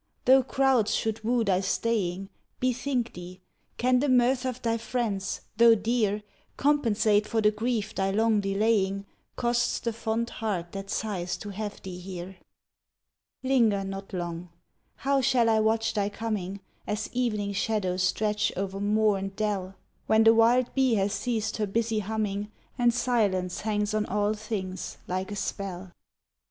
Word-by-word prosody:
Though 265 Hz, +1 st, +7 dB
crowds 260 Hz, -4 st, +2 dB
should 220 Hz, 0 st, -2 dB
woo 235 Hz, +1 st, +2 dB
thy 190 Hz, -3 st, +2 dB
staying, 195 Hz, -2 st, -1 dB, 0.3 s
Bethink 250 Hz, -1 st, -1 dB
thee, 180 Hz, +1 st, -9 dB, 0.4 s
can 250 Hz, +1 st, +3 dB
the 285 Hz, +2 st, +1 dB
mirth 250 Hz, +1 st, +3 dB
of 255 Hz, -1 st, -3 dB
thy 230 Hz, -1 st, 0 dB
friends, 205 Hz, -6 st, -2 dB, 0.2 s
though 230 Hz, 0 st, +7 dB
dear, 210 Hz, -1 st, 0 dB, 0.3 s
Compensate 220 Hz, -7 st, +2 dB
for 225 Hz, -, 0 dB
the 210 Hz, -1 st, +4 dB
grief 220 Hz, 0 st, -2 dB
thy 195 Hz, -2 st, 0 dB
long 220 Hz, +2 st, +2 dB
delaying 200 Hz, -1 st, +1 dB, 0.3 s
Costs 240 Hz, 0 st, +1 dB
the 235 Hz, -, -2 dB
fond 230 Hz, +1 st, -2 dB
heart 190 Hz, -6 st, -3 dB
that 195 Hz, 0 st, -7 dB
sighs 185 Hz, -6 st, -2 dB
to 205 Hz, -, -8 dB
have 205 Hz, +1 st, -6 dB
thee 180 Hz, -2 st, -7 dB
here? 185 Hz, 0 st, -7 dB, 1.1 s
Linger 230 Hz, -7 st, +3 dB
not 195 Hz, 0 st, -6 dB
long. 175 Hz, -1 st, -4 dB, 0.5 s
How 275 Hz, 0 st, +1 dB
shall 240 Hz, -2 st, +3 dB
I 220 Hz, -1 st, +4 dB
watch 225 Hz, +1 st, +1 dB
thy 205 Hz, -2 st, 0 dB
coming, 200 Hz, -3 st, -4 dB, 0.3 s
As 210 Hz, +1 st, -2 dB
evening 210 Hz, -5 st, -1 dB
shadows 190 Hz, -3 st, 0 dB
stretch 210 Hz, +3 st, +1 dB
o'er 195 Hz, 0 st, -3 dB
moor 210 Hz, 0 st, +2 dB
and 195 Hz, 0 st, -5 dB
dell; 195 Hz, -3 st, -2 dB, 0.3 s
When 220 Hz, 0 st, +5 dB
the 225 Hz, 0 st, +7 dB
wild 235 Hz, +2 st, +4 dB
bee 260 Hz, -3 st, +3 dB
hath 200 Hz, 0 st, +1 dB
ceased 220 Hz, 0 st, -2 dB
her 210 Hz, -2 st, 0 dB
busy 225 Hz, +2 st, 0 dB
humming, 210 Hz, 0 st, -2 dB, 0.2 s
And 240 Hz, -2 st, +3 dB
silence 210 Hz, -7 st, 0 dB
hangs 210 Hz, -1 st, -1 dB
on 215 Hz, 0 st, 0 dB
all 205 Hz, +1 st, +1 dB
things 205 Hz, -4 st, -5 dB
like 185 Hz, +2 st, -3 dB
a -, -, -3 dB
spell! 190 Hz, -2 st, -4 dB
215 Hz, 155 wpm, -27 LUFS, 195-230 Hz, 1.1 s, Though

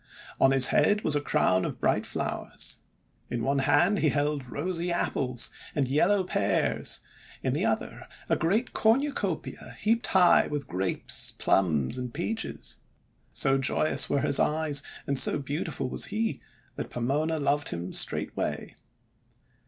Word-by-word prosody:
On 135 Hz, -, +5 dB
his 135 Hz, -1 st, +8 dB
head 210 Hz, +1 st, +3 dB
was 150 Hz, -, +3 dB
a 145 Hz, -, +1 dB
crown 95 Hz, -9 st, +1 dB
of -, -, -5 dB
bright -, -, 0 dB
flowers. -, -, -4 dB, 0.5 s
In 120 Hz, -1 st, -3 dB
one 140 Hz, +2 st, 0 dB
hand 200 Hz, +8 st, +3 dB
he 155 Hz, -, +2 dB
held 145 Hz, -2 st, -1 dB
rosy 170 Hz, +6 st, -3 dB
Apples 130 Hz, -7 st, -1 dB, 0.2 s
and 140 Hz, -3 st, 0 dB
yellow 180 Hz, +9 st, +2 dB
Pears, 185 Hz, -, -1 dB, 0.4 s
j -, -, -3 dB
in -, -, +1 dB
the -, -, 0 dB
other -, -, -3 dB, 0.2 s
a -, -, +2 dB
great 205 Hz, +9 st, -1 dB
cornucopia 270 Hz, +6 st, -1 dB
heaped 230 Hz, +2 st, +1 dB
high 180 Hz, -2 st, +4 dB
with, 145 Hz, -1 st, -4 dB
Grapes, 95 Hz, +1 st, -1 dB
Plums, 85 Hz, -, +1 dB
and 125 Hz, -1 st, -5 dB
Peaches. 220 Hz, +8 st, -3 dB, 0.5 s
So 135 Hz, 0 st, +2 dB
joyous 135 Hz, +3 st, +2 dB
were 140 Hz, -, +1 dB
his 140 Hz, 0 st, +5 dB
eyes 150 Hz, -2 st, +1 dB, 0.2 s
and 140 Hz, -1 st, +3 dB
so -, -, +5 dB
beautiful 140 Hz, -1 st, -4 dB
was -, -, -2 dB
he, 225 Hz, +1 st, -3 dB, 0.4 s
that -, -, -5 dB
Pomona 145 Hz, +7 st, -1 dB
loved 145 Hz, +1 st, 0 dB
him 85 Hz, +2 st, -5 dB
straightway. -, -, -1 dB
145 Hz, 145 wpm, -27 LUFS, 130-175 Hz, 0.5 s, his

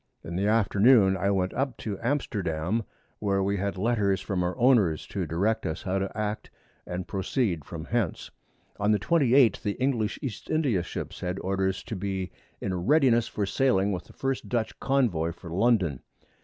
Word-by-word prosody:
In 85 Hz, -, -6 dB
the 100 Hz, +3 st, +1 dB
Afternoon 105 Hz, -1 st, +5 dB
I 95 Hz, +1 st, 0 dB
went 95 Hz, -2 st, 0 dB
up 135 Hz, -3 st, -2 dB
to 100 Hz, -4 st, -5 dB
Amsterdam, 100 Hz, -, -1 dB, 0.3 s
where 100 Hz, -2 st, +1 dB
we 100 Hz, +1 st, 0 dB
had 100 Hz, 0 st, -2 dB
Letters 100 Hz, -2 st, +1 dB
from 95 Hz, -1 st, -2 dB
our 90 Hz, 0 st, -1 dB
Owners, 110 Hz, -, +3 dB
to 95 Hz, -4 st, -4 dB
direct 100 Hz, +8 st, 0 dB
us 80 Hz, +2 st, -4 dB
how 95 Hz, 0 st, 0 dB
to 100 Hz, +2 st, -4 dB
act 105 Hz, 0 st, -3 dB, 0.4 s
and 90 Hz, 0 st, -4 dB
proceed 95 Hz, -, -1 dB
from 80 Hz, -1 st, -7 dB
hence. 115 Hz, -6 st, -2 dB, 0.5 s
On 105 Hz, +1 st, +3 dB
the -, -, +3 dB
28th 130 Hz, -, +4 dB
the 105 Hz, -3 st, -1 dB
English 120 Hz, -5 st, 0 dB
East 120 Hz, -8 st, -6 dB
India 140 Hz, -, +1 dB
Ships -, -, -6 dB
had 90 Hz, +1 st, -3 dB
Orders 95 Hz, 0 st, -1 dB
to 115 Hz, -, -5 dB
be 95 Hz, -1 st, -3 dB, 0.3 s
in 95 Hz, -, -3 dB
a 90 Hz, -, -1 dB
readiness 120 Hz, -, +3 dB
for 105 Hz, -, -2 dB
sailing 100 Hz, -3 st, +2 dB
with 90 Hz, -2 st, -4 dB
the -, -, -16 dB
first 135 Hz, -1 st, -3 dB
Dutch 115 Hz, -3 st, -2 dB
Convoy 110 Hz, -13 st, +1 dB
for 85 Hz, 0 st, -11 dB
London. 95 Hz, -, +2 dB
100 Hz, 180 wpm, -27 LUFS, 95-115 Hz, 0.5 s, Afternoon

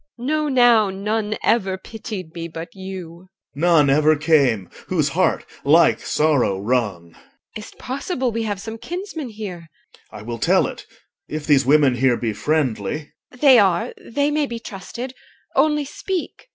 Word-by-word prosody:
EL. 240 Hz, -, -8 dB
Know 305 Hz, +1 st, 0 dB
now, 240 Hz, -5 st, +5 dB
none 210 Hz, +2 st, -2 dB
ever 195 Hz, -5 st, +1 dB
pitied 200 Hz, -5 st, -8 dB
me 165 Hz, 0 st, -5 dB
but 165 Hz, 0 st, -8 dB
you. 185 Hz, -2 st, -9 dB, 0.2 s
OR. 145 Hz, -, -8 dB
None 165 Hz, -4 st, +5 dB
ever 155 Hz, +2 st, +4 dB
came 140 Hz, -, +2 dB, 0.2 s
whose -, -, +1 dB
heart -, -, +1 dB, 0.2 s
like -, -, +5 dB
sorrow 145 Hz, -10 st, +1 dB
wrung. 100 Hz, -7 st, -1 dB
EL. -, -, -21 dB, 0.4 s
Is't 210 Hz, -, -11 dB
possible 260 Hz, 0 st, -3 dB
we 230 Hz, +1 st, -2 dB
have 205 Hz, -3 st, -2 dB
some 220 Hz, +2 st, -7 dB
kinsman 350 Hz, -, -6 dB
here? 195 Hz, -6 st, -7 dB, 0.4 s
OR. -, -, -9 dB
I -, -, -9 dB
will 115 Hz, +1 st, -5 dB
tell -, -, +3 dB
it, -, -, -7 dB, 0.4 s
if 155 Hz, 0 st, -5 dB
these 140 Hz, -3 st, +3 dB
women 140 Hz, -3 st, +4 dB
here 125 Hz, -1 st, +3 dB
be 115 Hz, -3 st, -2 dB
friendly. 145 Hz, 0 st, -1 dB, 0.2 s
EL. -, -, -14 dB
They 265 Hz, -4 st, +7 dB
are. 185 Hz, -4 st, +2 dB
They 285 Hz, +5 st, 0 dB
may 295 Hz, -1 st, +1 dB
be 235 Hz, -, -5 dB
trusted. 235 Hz, +4 st, -7 dB, 0.4 s
Only 300 Hz, +1 st, +2 dB
speak. 370 Hz, -, -5 dB
190 Hz, 165 wpm, -21 LUFS, 150-240 Hz, 0.4 s, They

